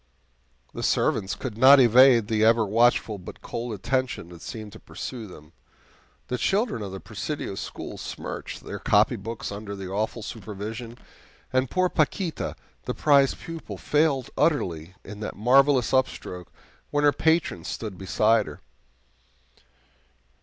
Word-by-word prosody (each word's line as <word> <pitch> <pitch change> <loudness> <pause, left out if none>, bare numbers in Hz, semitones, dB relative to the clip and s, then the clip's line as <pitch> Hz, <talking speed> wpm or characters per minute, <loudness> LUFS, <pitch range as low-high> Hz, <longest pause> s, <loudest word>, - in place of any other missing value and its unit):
The - - -5
servants 95 -1 +1
could 115 -4 -6
not 135 +3 +9
evade 120 -2 +6
the 110 -1 +1
ever 115 0 +5
watchful 110 0 +2
but 90 - -11
cold 120 +1 -4
attention 120 -2 -2
that 85 -1 -12
seemed 110 -3 -8
to - - -11
pursue 120 -4 -7
them. 75 -3 -14 0.7
The 125 - -3
children 205 - 0
of 100 -2 -5
the 95 - -6
Presidio 110 +4 -5
school 95 - -7
smirched - - -6
their - - -6
copybooks 115 +3 +1
under 100 0 -6
the 95 -1 -7
awful 110 +3 -2
supervision, 110 +2 -7 0.6
and 130 -1 +2
poor 185 0 +2
Paquita, 165 +1 -1 0.3
the - - -3
prize 140 -2 +4
pupil, 165 -1 -8
failed 145 -4 +1
utterly 90 - 0
in 105 +1 -9
that 105 - -5
marvelous 130 +3 +4
upstroke 90 -9 -1 0.4
when 145 0 0
her 145 - +6
patron 160 - +1
stood 100 +1 -6
beside 105 +3 +2
her. - - -9
115 Hz, 140 wpm, -25 LUFS, 100-135 Hz, 0.7 s, not